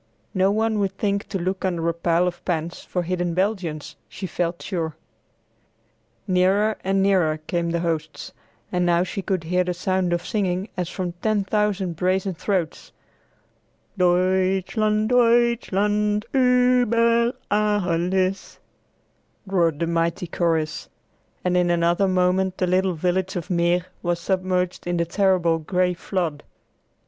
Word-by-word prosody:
No 190 -1 +3
one 220 +1 +1
would 195 -1 -1
think 200 0 -1
to 195 - -2
look 185 +2 -3
under 170 -3 -1
a 170 - +1
pile 170 +1 +1
of 175 -1 -4
pans 170 -1 -2
for 180 - -3
hidden 175 -1 -2
Belgians, 180 -6 -2
she 195 - -7
felt 170 -1 -2
sure. 165 -4 -3 1.3
Nearer 195 +4 +2
and 195 0 +1
nearer 180 -6 +2
came 170 +1 -1
the 170 0 -1
hosts, 160 -2 -3 0.4
and 180 -1 +1
now 175 0 +3
she 195 - -4
could 185 -3 -2
hear 180 +2 +1
the 180 0 -3
sound 185 0 0
of 175 0 -1
singing 195 -2 -1
as 180 -3 -3
from 180 -2 -3
ten 215 -2 +1
thousand 195 -4 -1
brazen 185 +2 0
throats, 180 -2 -3 1.0
"Deutschland, 190 +4 +1
Deutschland 220 -4 +2
uber 245 -2 +3 0.2
Alles," 190 -2 0 0.9
roared 170 -6 +1
the 170 - -1
mighty 170 +1 -1
chorus, 165 -2 -1 0.6
and 180 0 +1
in 180 -1 +2
another 170 +3 +2
moment 185 0 +1
the 185 - +1
little 185 0 +1
village 180 +3 -1
of 175 0 -4
Meer 175 0 +2 0.2
was 175 -1 -1
submerged 185 0 -1
in 175 0 0
the 170 - +1
terrible 180 -3 +2
gray 180 +2 0
flood. 170 -4 -3
185 Hz, 135 wpm, -23 LUFS, 175-200 Hz, 1.3 s, No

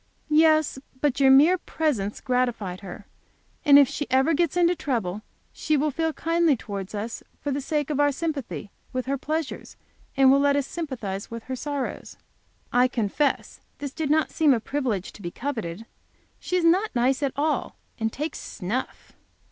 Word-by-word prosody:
"Yes, 310 -2 +4 0.2
but 285 -2 +1
your 270 -1 +6
mere 305 +7 +6
presence 250 -15 -2
gratified 240 -8 -1
her. 195 +1 -9 0.6
And 285 -3 +8
if 285 -2 +7
she 295 - -4
ever 265 +5 +3
gets 340 +1 +1
into 350 0 +4
trouble, 215 - -2 0.3
she 310 - 0
will 300 +2 +1
feel 320 +3 0
kindly 330 -2 +2
towards 200 -2 -6
us 220 +3 -4 0.2
for 290 - -3
the 280 +1 -1
sake 295 +1 -1
of 290 - -1
our 290 0 +4
sympathy 280 -8 -4 0.2
with 255 -1 -2
her 275 +1 0
pleasures, 310 +1 -4 0.4
and 265 -1 +7
will 275 - +5
let 280 0 +3
us 285 -2 +1
sympathize 240 - -5
with 230 -1 -7
her 260 - -4
sorrows." 285 +1 -4 0.6
I 250 +1 +5
confess 250 +4 -1 0.2
this 285 -2 -6
did 315 -3 -2
not 310 +1 +2
seem 300 -5 +4
a - - -1
privilege 230 -7 -2
to - - -13
be 175 - -4
coveted. 225 -5 -5 0.5
She 365 - -3
is 345 - +1
not 375 +4 +3
nice 255 +3 +2
at 275 -2 0
all, 300 +2 -1 0.2
and 225 0 0
takes 300 +4 -4
snuff. 225 +6 -5
275 Hz, 175 wpm, -25 LUFS, 235-305 Hz, 0.6 s, And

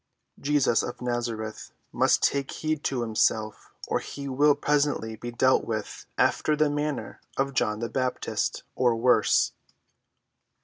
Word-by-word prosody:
Jesus 140 -5 +2
of 120 - -5
Nazareth 120 -3 -4 0.2
must - - +2
take 140 -1 +1
heed 155 -1 -2
to 125 -3 0
himself 110 -1 0 0.2
or - - 0
he 140 0 -7
will 145 +2 +4
presently 145 -6 0
be 120 +3 -7
dealt 130 +2 +3
with 110 -2 -5
after 155 - +2
the 150 -1 +2
manner 145 -1 -3 0.2
of 135 0 0
John 105 -4 0
the 115 - -1
Baptist—or 125 -1 -1
worse." 125 +2 +3
130 Hz, 130 wpm, -27 LUFS, 115-145 Hz, 0.2 s, will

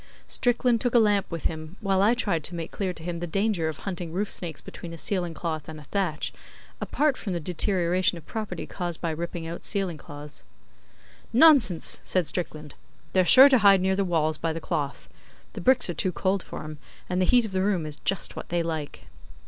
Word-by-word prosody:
Strickland 245 -1 +1
took 245 -1 0
a - - +8
lamp 205 -3 +3
with 170 -2 -6
him, 155 +2 -4
while 195 -3 +1
I 220 +4 +4
tried 200 -10 -1
to 175 - -3
make 165 -1 -5
clear 190 -2 -2
to 160 -2 -9
him 170 0 -4
the 175 - -4
danger 195 -2 0
of 155 - -6
hunting 180 -4 -5
roof 195 +4 -2
snakes 165 -5 -3
between 170 -1 -9
a - - -8
ceiling 175 -2 -1
cloth 160 -3 -4
and 155 -1 -8
a - - -12
thatch, 170 -1 -2 0.5
apart 295 -2 +1
from 195 - -4
the 170 - -1
deterioration 180 +1 +1
of 160 - -12
property 210 -6 -5
caused 175 -3 -5
by 165 - -2
ripping 170 +1 -5
out 165 +1 -6
ceiling 195 -6 -2
cloths. 145 - -10 0.9
'Nonsense!' 250 - +5
said 185 -2 +1
Strickland. 155 -2 -5 0.4
'They're 185 - +4
sure 265 +8 +9
to 260 -3 +5
hide 200 -2 +6
near 190 +1 +1
the 200 - +1
walls 155 -4 0
by 165 - -1
the 160 - -4
cloth. - - -3 0.5
The - - -6
bricks 255 -1 +4
are 175 - -2
too 185 +3 -1
cold 190 +2 0
for - - -8
'em, 155 -1 -8 0.3
and 180 0 -1
the - - +3
heat 245 +3 +4
of 215 - -6
the 190 0 0
room 190 -5 0
is 150 -1 -5
just 195 -2 -1
what - - -8
they 170 0 0
like. 160 -3 -5
180 Hz, 215 wpm, -26 LUFS, 165-200 Hz, 0.9 s, sure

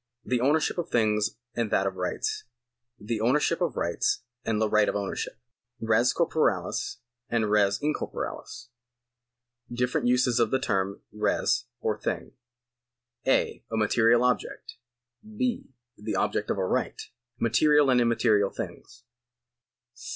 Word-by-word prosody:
The 125 -1 0
ownership 150 +6 +2
of 170 - -3
things 110 -1 +1 0.2
and 115 -3 -1
that 95 - +2
of 95 -1 -2
rights. 430 - -2 0.5
The 110 +1 -3
ownership 150 +8 +2
of 165 -8 -1
rights 85 +7 0 0.2
and 110 -2 0
the 110 - +2
right 105 0 +3
of - - -2
ownership. 100 -1 -3 0.4
Res 115 +2 +3
corporales - - 0 0.3
and 110 -3 0
res 100 -1 +3
incorporales. 150 -4 -4 1.0
Different 125 0 0
uses 125 -1 +3
of 115 -2 +3
the 130 - +2
term 100 -6 -1
res - - 0 0.2
or - - -1
thing. - - -3 1.0
(a) 135 - +1
A 110 - -1
material 115 +2 +4
object. 125 0 -1 0.7
{h) 250 -2 0 0.3
The 105 - -4
object - - 0
of - - 0
a - - 0
right. - - -1 0.4
Material 145 +5 +4
and 125 -1 +4
immaterial 115 -4 +3
things. 115 0 -8
115 Hz, 130 wpm, -27 LUFS, 105-125 Hz, 1.0 s, material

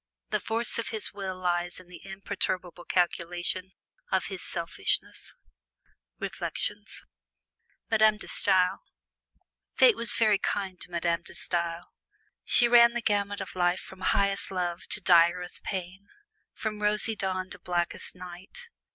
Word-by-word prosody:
The - - +1
force 230 +1 0
of 230 - -2
his 220 -2 +2
will 190 -2 -5
lies 175 -1 -1
in 185 - -15
the 175 -2 -13
imperturbable 190 -2 -4
calculation 175 +1 -1 0.4
of 190 -1 +1
his 185 - -6
selfishness. 165 - -2 0.8
Reflections - - -3
[Illustration: - - -47
MADAME 215 -1 +5
DE - - -9
STAEL] 190 -2 +2 1.0
Fate 485 -4 +6
was 235 -1 +4
very 215 -3 +3
kind 190 -3 -3
to - - -4
Madame 170 -1 0
De 175 - -12
Stael. 170 -1 -3 0.5
She 240 - +6
ran 235 0 +7
the 240 -1 -3
gamut 205 -1 0
of - - -7
life 175 0 +2
from 190 - -12
highest 200 +1 +1
love 175 -2 -3
to 210 - -3
direst 175 0 +3
pain 190 +1 -5 0.4
from 215 -1 -5
rosy 210 +1 +1
dawn 185 -2 -3
to - - -9
blackest 175 0 -3
night. 185 - -10
185 Hz, 140 wpm, -28 LUFS, 175-205 Hz, 1.0 s, ran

